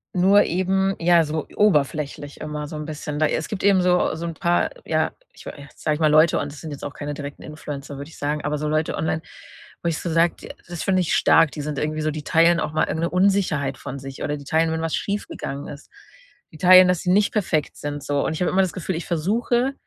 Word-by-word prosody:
Nur 195 +3 +5
eben, 190 +2 0
ja, 170 0 +4
so 155 0 -3
oberflächlich 150 -6 0
immer 150 -1 -5
so 155 - -8
'n 150 0 -5
bisschen. 150 -1 -5
Da 155 - +3
es 155 +1 -1
gibt 210 - -5
eben 195 -2 +4
so 180 0 +2
so 165 +2 -5
'n 165 - -5
paar, 175 +1 +1 0.2
ja, - - 0 0.2
ich - - -15
wei - - -4
äh, 145 -1 -12
sage 155 -1 -1
ich - - -7
mal, 155 -1 +3
Leute, 155 +2 +5
und 145 - -4
das 145 - -11
sind 160 - -7
jetzt 145 -2 -7
auch 145 - -6
keine 145 0 -5
direkten 145 0 -8
Influencer, 145 -2 -8
würde 140 +2 -8
ich - - -14
sagen, 150 +1 -2
aber 150 0 -2
so 150 - -2
Leute 155 +1 0
online, 160 0 -2 0.6
wo - - -3
ich 160 - -2
so 170 - -4
sage: 165 +1 +3
„Die - - -11 0.2
das 175 -1 -5
finde 185 -2 +2
ich 175 - 0
stark, 165 -1 +5
die 150 - -6
sind 145 -1 -4
irgendwie 155 +1 -2
so 155 0 0
die 150 0 -6
teilen 165 +3 +4
auch 150 - -3
mal 155 - +2
irgend 160 - -2
'ne - - -1
Unsicherheit 180 -8 +1
von 140 - -6
sich 135 0 -9
oder 150 0 -2
die 145 - -11
teilen, 160 +3 +1
wenn 160 0 -2
was 165 -1 -1
schief 205 0 -3
gegangen 140 +1 -6
ist. 145 0 -10 0.6
Die 155 - -12
teilen, 185 +1 +8
dass 180 -2 +2
sie 180 - -2
nicht 205 +2 +3
perfekt 170 -8 0
sind,“ 145 -1 -5
so 145 -1 0
und - - -1
ich 160 - -5
habe - - 0
immer 190 - +3
das 185 -3 -1
Gefühl, 185 +1 -3
ich 165 - -5
versuche 235 - 0
160 Hz, 260 wpm, -22 LUFS, 150-180 Hz, 0.6 s, teilen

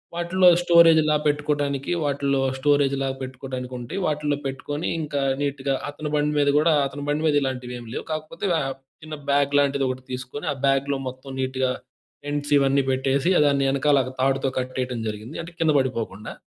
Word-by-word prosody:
వాటిలో 180 +2 +3
స్టోరేజ్‌లాగా 160 -3 +5
పెట్టుకోవడానికి 145 -1 -1
వాటిల్లో 140 -1 0 0.2
స్టోరేజ్‌లాగా 135 -2 +1
పెట్టుకోవడానికి 130 -1 -6
ఉంటాయి. 150 +11 -5
వాటిలో 150 -1 0
పెట్టుకొని 145 +4 -4
ఇంకా 145 -2 -2 0.2
నీట్‌గా 140 -1 -1
అతని 150 +1 -5
బండి 150 0 +1
మీద 145 0 +3
కూడా 160 +1 +3
అతని 145 +1 -8
బండి 150 +2 0
మీద 150 - +2
ఇలాంటివి 125 -2 -3
ఏమీ 115 -2 -11
లేవు - - -4
కాకపోతే 155 +5 -4
ఆహ్ 135 -1 -2 0.3
చిన్న 155 -1 -7
బ్యాగ్ 140 0 +2
లాంటిది 140 -1 +1
ఒకటి 130 0 -5
తీసుకొని 130 +4 -6
ఆ - - -10
బ్యాగ్‌లో 135 0 +1
మొత్తం 130 +1 -8
నీట్‌గా 130 0 0 0.5
టెంట్స్ 145 0 -2
ఇవన్నీ 140 0 +2
పెట్టేసి 135 +6 +1 0.2
దాన్ని 140 -1 +2
వెనకాల 140 0 +3 0.2
తాడుతో 135 0 +1
కట్టేయడం 125 -2 -3
జరిగింది. 110 +7 -7
అంటే 170 - -11
కింద 160 -1 +4
పడిపోకుండా. 115 -5 -3
140 Hz, 155 wpm, -24 LUFS, 130-150 Hz, 0.5 s, స్టోరేజ్‌లాగా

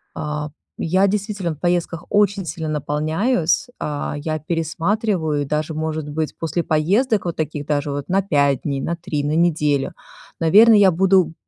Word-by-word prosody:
А, 150 -1 -4 0.3
я 185 +4 +2
действительно 200 -4 -2
в - - -24
поездках 175 -1 -1
очень 205 -2 +2
сильно 160 0 -4
наполняюсь, 155 - 0
а. 145 -1 -3
Я 155 +1 -3
пересматриваю, 165 0 -1
даже, 155 +2 -2
может 155 -1 -3
быть, 155 +1 -3
после 165 +1 -2
поездок 200 - +1
вот 170 - -2
таких, 150 -2 -3
даже 145 -1 -1
вот 140 0 -4
на 195 +2 +3
5 140 -7 +1
дней, 140 -2 -2
на 170 - -2
3, 150 -3 -3
на 150 +2 0
неделю. 150 -5 +1 0.5
Наверное, 210 +7 +6
я 195 -2 +6
буду, 185 -1 +3
160 Hz, 155 wpm, -20 LUFS, 150-190 Hz, 0.5 s, Наверное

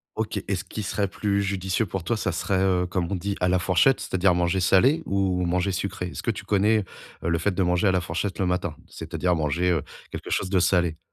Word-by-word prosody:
OK. - - -2
Et - - 0
ce - - -4
qu'il 110 - -6
serait 100 +1 -1
plus 100 +1 -1
judicieux 95 +1 -1
pour 95 0 -4
toi, 120 - 0
ça 95 - -1
serait, 95 +2 -1
heu, 90 -2 +2
comme 90 0 -2
on - - 0
dit: 100 +2 -3
«à 90 - +3
la 90 - +3
fourchette», 95 +8 +3
c'est-à-dire 95 -1 +1
manger 85 +2 +1
salé 110 - +4
ou 95 -2 +1
manger 90 +2 0
sucré? 90 0 -3
Est-ce - - -7
que - - -2
tu 110 - -8
connais, 105 +1 +3 0.4
heu, 85 - 0
le 85 - +2
fait 105 +5 +1
de 95 - +2
manger 90 +3 +2
à - - +4
la 95 - +2
fourchette 90 +3 -3
le 95 - +1
matin? 90 0 -1
C'est-à-dire 90 -1 -2
manger, 85 +3 +1
heu, 80 -4 +1 0.3
quelque - - -7
chose 95 - -1
de 95 - +3
salé. 85 -3 +2
95 Hz, 245 wpm, -25 LUFS, 90-100 Hz, 0.4 s, salé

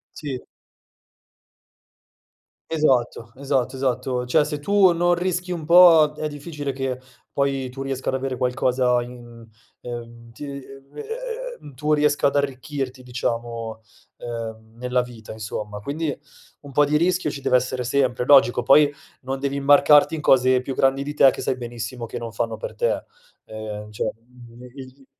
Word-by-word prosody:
Sì. 135 -4 -5 2.3
Esatto, 125 -7 +1
esatto, 135 -1 -1
esatto. 125 -1 -1
Cioè 150 +5 +3
se 150 -1 -4
tu 195 +3 +4
non 175 +1 +2
rischi 180 0 -2
un 170 -3 -3
po' 165 -3 +7
è 155 0 -3
difficile 145 -1 -5
che 130 -1 -3 0.3
poi 135 -2 0
tu 135 +2 -7
riesca 135 -1 -2
ad - - -4
avere 130 0 -2
qualcosa 125 0 +1
in 120 -1 -11 0.4
ehm, 115 -1 -9
ti 135 - -9
ehm 140 -1 -6 0.4
ehm - - -18
ehm - - -6 0.6
ehm, 140 - -12
tu 150 +4 -1
riesca 145 -1 +2
ad 140 - -2
arricchirti 135 -1 -3
diciamo, 115 -2 -4 0.4
ehm, 115 -1 -7
nella 125 0 0
vita, 120 -3 -10
insomma. 105 -1 -6
Quindi, 145 +5 -3 0.4
un 140 -1 -12
po' 145 +2 +4
di 150 +1 +1
rischio 175 -1 +1
ci 140 - -6
deve 130 - +3
essere 125 0 -1
sempre, 125 -1 +1
logico, 125 -3 +5
poi 145 +3 +5 0.3
non 135 +1 -4
devi 140 0 -2
marcarti 145 +2 +5
in 160 - -4
cose 130 -3 +4
più 130 +1 -5
grandi 135 +1 +2
di 145 +1 -5
te, 135 -2 +6
che - - -7
sai 130 - -1
benissimo 120 0 -6
che - - -6
non 115 -1 -6
fanno 115 0 -2
per - - -7
te. 485 0 0 0.4
Ehm, 105 -1 -7
cioè 105 - -2
mh 120 +1 -18
mhmm, 120 - -14
il 125 - -12 0.3
il 135 - -21
130 Hz, 165 wpm, -23 LUFS, 120-145 Hz, 2.3 s, po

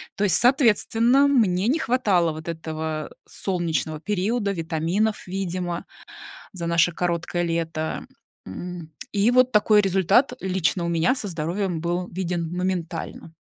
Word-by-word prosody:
То 205 - -1
есть, 195 - +4
соответственно, 245 +1 +4
мне 210 -7 +2
не 305 +6 +2
хватало 200 - +2
вот 155 +1 -9
этого 160 -2 -4 0.2
солнечного 165 -4 -2
периода, 205 +3 -1
витаминов, 170 +5 -1
видимо, 180 -2 -3 0.7
за 175 -4 -6
наше 170 +1 +3
короткое 175 0 -1
лето. 165 -2 -3 0.4
М, 170 - -7 0.2
и 205 +3 +2
вот 255 +1 +4
такой 210 -1 +5
результат 195 +7 +3
лично 180 -2 0
у - - -1
меня 170 +8 +2
со 220 -6 -4
здоровьем 170 +1 -2
был 175 +1 -2
виден 175 -2 -3
моментально. 170 -3 -4
180 Hz, 130 wpm, -24 LUFS, 165-210 Hz, 0.7 s, такой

